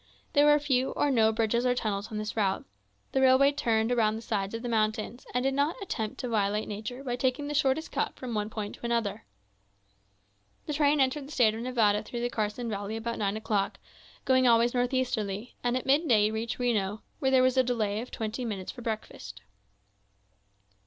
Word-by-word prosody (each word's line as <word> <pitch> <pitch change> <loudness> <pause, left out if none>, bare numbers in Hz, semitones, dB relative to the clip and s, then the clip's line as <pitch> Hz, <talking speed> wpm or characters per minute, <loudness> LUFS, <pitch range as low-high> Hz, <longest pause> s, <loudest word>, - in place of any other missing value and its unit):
There 290 -1 +5
were 295 0 +7
few 265 -3 0
or 290 - +1
no 220 -3 +4
bridges 225 +2 +1
or 250 -1 +2
tunnels 210 -3 -2
on 215 - -4
the 215 0 -3
route. 200 -4 0 0.5
The 265 - +1
railway 265 +2 +6
turned 230 -5 +1
around 220 -3 +2
the 225 - -7
sides 200 0 -2
of 230 - -6
the - - -3
mountains, 220 +1 -1
and 250 +1 0
did 270 0 +1
not 285 +4 +1
attempt 220 - -4
to 250 - -3
violate 210 -2 0
nature 220 +6 -6
by 245 -3 -2
taking 260 +3 0
the 295 - -3
shortest 295 +1 +1
cut - - -1
from 250 -2 -6
one 210 -1 -1
point 215 -2 -5
to - - -12
another. 230 -3 -1 1.4
The 300 - -3
train 290 0 +3
entered 270 +1 +1
the - - -12
State 230 -7 +3
of 225 - -5
Nevada 225 -4 +2
through 240 - -6
the 240 0 -1
Carson 220 +2 -2
Valley 205 0 -3
about 230 +1 -4
nine 205 0 0
o'clock, 210 -2 -1 0.5
going 260 -1 +4
always 235 0 +4
northeasterly; 245 -4 -1
and 245 +1 +1
at 255 - -5
midday 260 -7 +3
reached 225 +1 -3
Reno, 215 -4 -1 0.2
where 265 - +1
there 260 -1 +5
was 255 0 +3
a 260 - +6
delay 220 -4 -1
of 250 - -8
twenty 220 +3 -4
minutes 200 -5 -4
for 245 - -11
breakfast. 215 - -6
235 Hz, 200 wpm, -28 LUFS, 215-260 Hz, 1.4 s, were